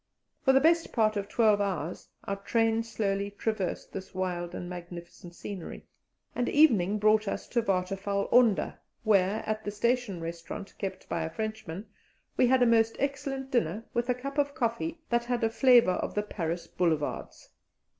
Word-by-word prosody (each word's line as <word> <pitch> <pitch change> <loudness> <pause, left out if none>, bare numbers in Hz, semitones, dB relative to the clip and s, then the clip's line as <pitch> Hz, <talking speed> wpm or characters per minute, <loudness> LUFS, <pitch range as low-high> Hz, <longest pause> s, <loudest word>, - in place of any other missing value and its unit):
For 265 - +5
the 265 - +6
best 330 +3 +3
part 215 -2 +2
of 200 0 -3
twelve 215 -2 +3
hours 180 -4 -3 0.2
our 200 - -3
train 225 +2 +1
slowly 200 -3 -2
traversed 205 -2 -3
this 190 -1 -7
wild 180 -2 -2
and 175 - -5
magnificent 175 0 -9
scenery, 190 -3 -7 0.5
and 245 - -1
evening 215 - +4
brought 215 0 +3
us - - -3
to 240 - +1
Waterfall 195 0 -1
Onder, 235 -5 +3 0.2
where, 205 -1 +3
at 215 0 -2
the 205 - -3
station 235 -2 0
restaurant, 165 +3 -6
kept 190 -2 -5
by 165 - -2
a 160 - -2
Frenchman, 215 -2 -5 0.5
we 250 - +4
had 255 0 +4
a - - +5
most 225 -1 +3
excellent 275 -1 -3
dinner, 215 -1 0
with 240 +1 -1
a 250 - +3
cup 275 +3 -4
of 285 0 0
coffee 310 +5 -1
that 235 0 +2
had 240 -1 -1
a 225 - +2
flavour 245 -5 +6
of - - -3
the 210 - +1
Paris 170 -4 -3
boulevards. 160 -4 -2
215 Hz, 170 wpm, -29 LUFS, 185-240 Hz, 0.5 s, the